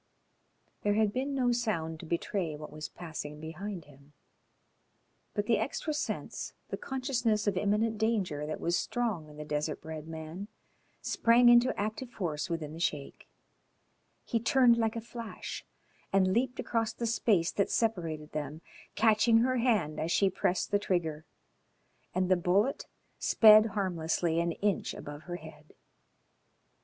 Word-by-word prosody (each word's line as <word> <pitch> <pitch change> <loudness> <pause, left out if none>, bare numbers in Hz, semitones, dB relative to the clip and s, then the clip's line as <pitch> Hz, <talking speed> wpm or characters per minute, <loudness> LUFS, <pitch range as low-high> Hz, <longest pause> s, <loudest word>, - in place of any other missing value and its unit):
There 205 0 +1
had 215 -1 +2
been 275 +2 -1
no 250 -2 +2
sound 170 -10 -1
to 165 - -9
betray 170 -1 -2
what 150 0 -9
was 155 0 -6
passing 150 -3 -7
behind 170 +3 -6
him, 140 0 -19 1.2
but - - 0
the - - +3
extra 310 - -2
sense, 300 - -4 0.2
the - - -2
consciousness 250 -5 -1
of 205 -2 +1
imminent 210 +3 +1
danger 190 -10 0
that 155 - -4
was 170 +1 0
strong 215 -12 -1
in 150 - -13
the 150 - -6
desert 150 +1 -2
bred 155 -1 -7
man, 160 +4 -7 0.6
sprang 240 +1 +5
into 240 +1 +5
active 215 +5 -3
force 170 -8 -3
within 160 -3 -3
the 165 - -8
Sheik. 150 -4 -3 1.0
He 230 - 0
turned 240 +1 +5
like 225 -1 0
a 230 - -3
flash 230 0 -7 0.5
and 185 -1 +3
leaped 250 +2 0
across 225 -2 -1
the 235 - -4
space 210 -6 +2
that 200 - 0
separated 165 -9 -1
them, 150 +1 -5 0.3
catching 225 +1 +4
her 255 +1 +2
hand 215 -11 +1
as 160 +2 -1
she 195 +1 +3
pressed 180 0 0
the 205 - +3
trigger, 160 -6 -1 0.9
and 185 0 +2
the 185 - +5
bullet 195 +9 +1 0.3
sped 215 0 +7
harmlessly 170 -5 0
an 170 0 0
inch 200 -1 -1
above 145 0 -8
her 175 - -2
head. 155 -2 -12
190 Hz, 150 wpm, -30 LUFS, 160-225 Hz, 1.2 s, sped